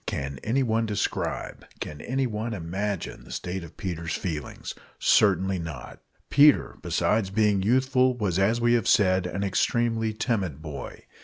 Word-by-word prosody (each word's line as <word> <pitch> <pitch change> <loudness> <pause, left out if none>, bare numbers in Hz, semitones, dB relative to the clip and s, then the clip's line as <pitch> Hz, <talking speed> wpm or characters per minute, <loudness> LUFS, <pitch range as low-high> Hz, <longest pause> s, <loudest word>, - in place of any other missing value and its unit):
Can 70 -1 -3
anyone 115 -2 +1
describe, 105 -2 -3 0.2
can 75 -1 -6
anyone 120 -4 -2
imagine, 95 +2 -4
the - - -13
state 90 0 -4
of 85 - -12
Peter's 85 -3 -3
feelings? 80 -5 -5 0.2
Certainly 95 -2 +3
not! 80 -7 -7 0.3
Peter, 145 0 +5
besides 105 -3 +1
being 105 -1 +2
youthful, 130 +3 +2
was, 95 -6 0
as 110 +5 +2
we 120 0 +3
have 115 -3 +1
said, 95 -2 +3
an 100 +2 -3
extremely 115 +3 +1
timid 105 - -2
boy. 75 -3 -8
100 Hz, 140 wpm, -26 LUFS, 90-115 Hz, 0.3 s, Peter